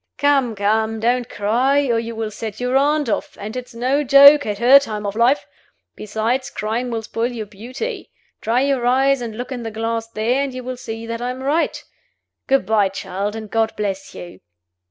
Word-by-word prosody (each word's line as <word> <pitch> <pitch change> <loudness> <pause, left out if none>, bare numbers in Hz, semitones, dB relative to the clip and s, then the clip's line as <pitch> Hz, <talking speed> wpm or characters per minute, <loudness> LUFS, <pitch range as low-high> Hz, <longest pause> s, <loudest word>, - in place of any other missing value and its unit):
Come, 275 -5 +2
come! 220 +2 0
don't 240 +2 0
cry, 255 +8 +1
or 230 - +2
you 230 0 -5
will 220 -1 -3
set 215 0 -7
your 250 +1 -1
aunt 290 +1 +2
off 215 - -3
and 210 +3 -6
it's 250 -2 -7
no 260 +5 +1
joke 280 +1 +7
at 205 -1 -2
her 255 +5 +7
time 215 -6 -5
of 200 0 -3
life. 240 +5 +2 0.5
Besides, 225 +5 -2
crying 225 +4 -3
will 225 -2 -3
spoil 230 +2 -2
your 225 -3 -5
beauty. 240 - -7 0.3
Dry 235 +3 +1
your 275 -2 0
eyes 270 +1 +3
and 225 -2 -6
look 250 +2 -6
in 250 -2 -4
the 225 - -4
glass 225 +1 -3
there, 230 +4 0
and 275 -2 -3
you 255 - -6
will 255 0 -5
see 225 -1 -7
that 230 0 -5
I 245 - -2
am 255 +1 -6
right. 300 +5 0 0.6
Good 270 -6 +2
by, 210 -1 +2
child 195 +2 -4
and 220 -1 -6
God 225 +1 0
bless 195 -2 -4
you!" 175 - -10
230 Hz, 200 wpm, -20 LUFS, 220-260 Hz, 0.6 s, joke